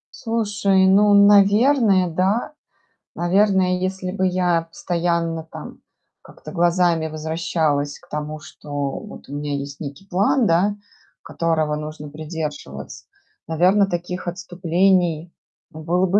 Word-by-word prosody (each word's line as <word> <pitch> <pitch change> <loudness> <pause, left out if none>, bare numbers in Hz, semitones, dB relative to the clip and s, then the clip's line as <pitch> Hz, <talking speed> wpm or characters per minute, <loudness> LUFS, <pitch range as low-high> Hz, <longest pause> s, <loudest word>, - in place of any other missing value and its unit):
Слушай, 205 -4 +1
ну, 200 +2 +5
наверное, 205 +1 +5
да. 190 - 0 0.6
Наверное, 185 +1 +2
если 185 0 -3
бы 190 -1 -1
я 180 -2 +1
постоянно, 165 -1 -2
там, 160 - -10 0.5
как-то - - -12
глазами 175 -2 +2
возвращалась 155 -2 -2
к - - -23
тому, 150 +1 -5
что 150 0 -14
вот 140 -2 -5
у 140 - -6
меня 145 0 -3
есть 140 0 -6
некий 150 +6 -8
план, 205 +6 +2
да, 190 +5 +2 0.5
которого 160 -2 -1
нужно 150 0 -7
придерживаться, 150 - -7 0.4
наверно, 180 +6 +3
таких 180 0 -4
отступлений, 175 -1 0 0.4
ну, 155 0 -11
было 180 +3 +1
бы 195 +3 +3
175 Hz, 120 wpm, -21 LUFS, 155-190 Hz, 0.6 s, ну